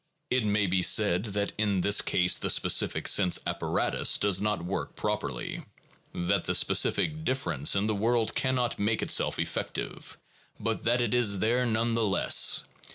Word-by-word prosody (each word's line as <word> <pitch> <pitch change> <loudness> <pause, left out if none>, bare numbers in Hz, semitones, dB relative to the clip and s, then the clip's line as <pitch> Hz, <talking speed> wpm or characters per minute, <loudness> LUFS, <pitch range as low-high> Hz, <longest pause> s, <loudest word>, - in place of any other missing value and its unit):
It 125 -1 +1
may 105 -1 0
be 95 0 0
said 100 0 +3
that 100 -1 -3
in 100 -3 0
this 100 +3 +3
case 90 0 +2
the - - -2
specific - - +2
sense 90 -3 +4
apparatus - - 0
does 100 -2 +1
not 105 -4 -2
work 95 - -5
properly, - - -4 0.5
that 85 0 -2
the - - -1
specific 155 0 +1
difference 100 - 0
in 100 +1 0
the 110 - -1
world 115 +2 0
cannot 130 -2 -1
make 110 +2 -1
itself - - +1
effective, - - -5 0.4
but 115 +1 -4
that 120 +1 +1
it 120 -2 -1
is 115 -5 +2
there 120 +5 0
none 115 +1 -1
the 115 0 0
less. 100 -2 +3
105 Hz, 160 wpm, -27 LUFS, 100-120 Hz, 0.5 s, sense